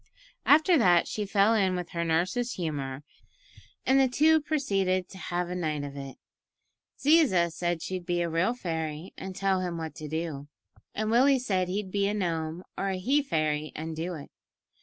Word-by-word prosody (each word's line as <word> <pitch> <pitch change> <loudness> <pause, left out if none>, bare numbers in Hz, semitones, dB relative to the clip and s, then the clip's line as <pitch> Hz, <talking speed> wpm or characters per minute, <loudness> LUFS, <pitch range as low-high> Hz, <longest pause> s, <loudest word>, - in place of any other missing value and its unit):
After 315 +3 +6
that 175 -6 +4
she 210 -1 -3
fell 200 +2 +4
in 190 -4 +2
with 180 -1 -4
her 170 0 -2
nurse's 185 +10 0
humour, 145 -5 -4 0.8
and 265 +1 +4
the 265 - +5
two 310 +5 +4
proceeded 195 - 0
to 190 - -11
"have 175 +1 -2
a 180 - -4
night 155 -5 -2
of 140 -1 -7
it." 135 -1 -8 0.8
Ziza 270 - +4
said 175 0 -2
she'd 185 -2 -5
be 175 -1 +1
a - - -1
real 170 +8 +1
fairy 160 -5 -4
and 190 -1 -7
tell 195 -1 +1
him 175 -2 -3
what 160 -1 -5
to 155 - -8
do, 155 -2 -4 0.5
and 215 +1 -1
Willie 265 +4 +5
said 190 -7 0
he'd 190 +1 -3
be 200 0 +1
a 205 - -1
gnome 165 -3 -2
or 195 - -2
a 190 - -1
he 270 +11 +2
fairy 155 - -1
and 160 +1 -5
do 170 +3 -3
it. 145 - -10
180 Hz, 185 wpm, -28 LUFS, 160-210 Hz, 0.8 s, After